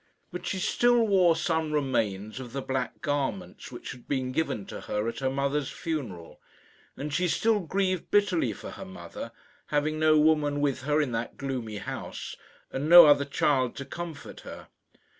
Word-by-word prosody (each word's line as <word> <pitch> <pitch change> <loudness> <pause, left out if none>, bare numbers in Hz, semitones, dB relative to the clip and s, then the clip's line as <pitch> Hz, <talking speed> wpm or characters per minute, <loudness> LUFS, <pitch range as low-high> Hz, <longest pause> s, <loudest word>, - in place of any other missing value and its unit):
But 180 0 -6
she - - -1
still 240 +5 +3
wore 185 -5 +4
some 160 -2 -1
remains 110 -7 -1
of 125 -2 -8
the 135 - -2
black 130 -1 -3
garments 145 +5 -3
which 120 - -7
had 125 - -12
been 130 -2 -1
given 130 -8 -1
to - - -8
her 105 +2 -2
at 115 - -4
her 135 -1 0
mother's 140 +1 -1
funeral; 120 - -5 0.6
and 145 +1 -5
she 180 +4 +1
still 220 +5 +2
grieved 185 0 -1
bitterly 185 - +2
for 100 - -8
her - - -8
mother, 90 -2 -8 0.4
having 155 +1 0
no 155 0 +5
woman 150 -1 +3
with 140 -3 0
her 150 +1 +2
in 140 -4 -1
that 115 0 -4
gloomy 125 -6 -4
house, - - -6 0.4
and 140 +4 -2
no 175 0 +11
other 145 -1 +5
child 135 -3 +1
to 140 - -6
comfort 165 -3 -7
her. - - -10
145 Hz, 175 wpm, -28 LUFS, 130-165 Hz, 0.6 s, no